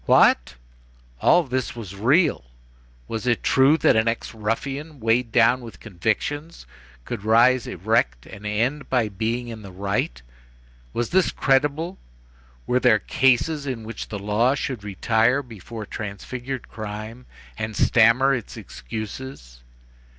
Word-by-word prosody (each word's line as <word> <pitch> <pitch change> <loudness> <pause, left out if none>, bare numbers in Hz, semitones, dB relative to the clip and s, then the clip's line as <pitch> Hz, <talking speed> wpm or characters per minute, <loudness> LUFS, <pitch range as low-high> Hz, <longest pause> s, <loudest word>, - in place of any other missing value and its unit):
What,—all - - +2
this 130 -4 -3
was 105 -6 -7
real! 130 - +2 0.6
was 115 +2 -4
it 120 -2 +1
true 135 +4 +4
that 145 - +4
an 110 +1 +2
ex 115 0 -2
ruffian, 135 +7 -4
weighed 115 +1 +1
down 120 +2 +4
with 115 -2 -11
convictions, 115 - -3 0.4
could 100 - -5
rise 120 +3 +4
erect 85 - 0
and 100 - -11
end 120 +7 -1
by 120 -4 +1
being 115 +4 -2
in 110 -2 -7
the 100 -2 -10
right? 95 -10 -2 0.7
Was 120 - -2
this 185 -1 +3
credible? 145 +7 +1 0.7
were 125 - +2
there 110 - +5
cases 135 +6 +1
in 125 -4 -4
which 110 0 -7
the 105 - -4
law 105 +6 +1
should 130 -6 -4
retire 110 +7 +1
before 115 -2 -9
transfigured 120 +6 -6
crime, 110 +3 -7 0.3
and 110 0 -4
stammer 125 +6 +4
its 120 -5 -5
excuses? 80 - -8
115 Hz, 130 wpm, -23 LUFS, 105-130 Hz, 0.7 s, there